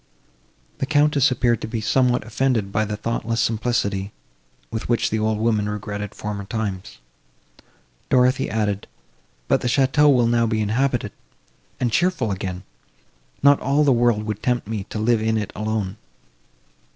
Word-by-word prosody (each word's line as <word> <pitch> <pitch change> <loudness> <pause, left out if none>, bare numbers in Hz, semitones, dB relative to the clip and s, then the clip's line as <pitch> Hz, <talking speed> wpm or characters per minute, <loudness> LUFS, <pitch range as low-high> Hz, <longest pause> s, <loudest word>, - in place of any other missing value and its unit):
The 135 - -1
Countess 145 -1 +3
appearing 120 -3 +1
to - - -5
be 110 0 -3
somewhat 125 +2 +1
offended 115 -3 0
by 110 +2 +1
the 105 0 -4
thoughtless 115 +1 -2
simplicity, 110 -4 0 0.6
with 110 0 -4
which 120 - +1
the 110 - 0
old 110 0 0
woman 110 -2 +1
regretted 105 0 -5
former 105 -1 -5
times, 95 - -4 1.1
Dorothée 125 +1 +3
added—"But 100 - -3
the - - -1
château 140 +3 +4
will 125 -3 +4
now 115 0 +2
be 110 -1 0
inhabited, 110 +1 0 0.7
and 120 -2 0
cheerful 160 - +1
again; 95 -1 -4 0.8
not 140 0 +6
all 140 +3 +2
the 140 -2 +4
world 120 -3 +2
could 105 -1 -4
tempt 125 -4 0
me 105 -3 -4
to 110 - -7
live 110 +1 +2
in 110 0 +1
it 105 -3 -4
alone." 110 -1 -2
110 Hz, 150 wpm, -22 LUFS, 105-125 Hz, 1.1 s, not